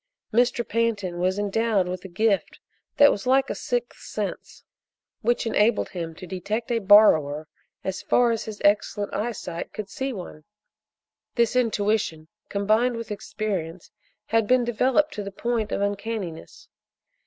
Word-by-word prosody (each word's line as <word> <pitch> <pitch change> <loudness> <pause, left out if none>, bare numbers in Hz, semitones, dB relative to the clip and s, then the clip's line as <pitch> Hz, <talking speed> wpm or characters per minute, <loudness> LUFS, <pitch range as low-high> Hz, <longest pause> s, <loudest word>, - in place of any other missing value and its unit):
Mr. 240 0 +2
Pantin 210 -6 -1
was 185 +2 +1
endowed 205 -1 +1
with 180 0 -5
a - - -7
gift 200 +2 0 0.4
that 285 0 +8
was 205 - -4
like 265 +1 +3
a - - 0
sixth - - -3
sense, - - -6 0.6
which 240 +1 +1
enabled 220 0 +2
him 165 -3 -5
to 185 - -9
detect 210 +6 -3
a 235 - +2
borrower 160 -8 +5 0.4
as 190 0 -3
far 245 -1 +3
as 225 - -2
his 215 -2 -7
excellent 205 0 +1
eyesight 200 -6 -4
could 205 -2 -6
see 265 +1 -3
one. 180 -8 -8 0.9
This 235 0 +2
intuition, 210 -9 0 0.2
combined 215 +5 +2
with 230 -2 -6
experience, 200 -5 -4 0.3
had 225 -1 +1
been 255 +1 +4
developed 255 +6 +2
to 210 - -4
the 200 - -6
point 230 +1 -2
of - - -1
uncanniness. 200 -4 -4
210 Hz, 145 wpm, -25 LUFS, 190-230 Hz, 0.9 s, that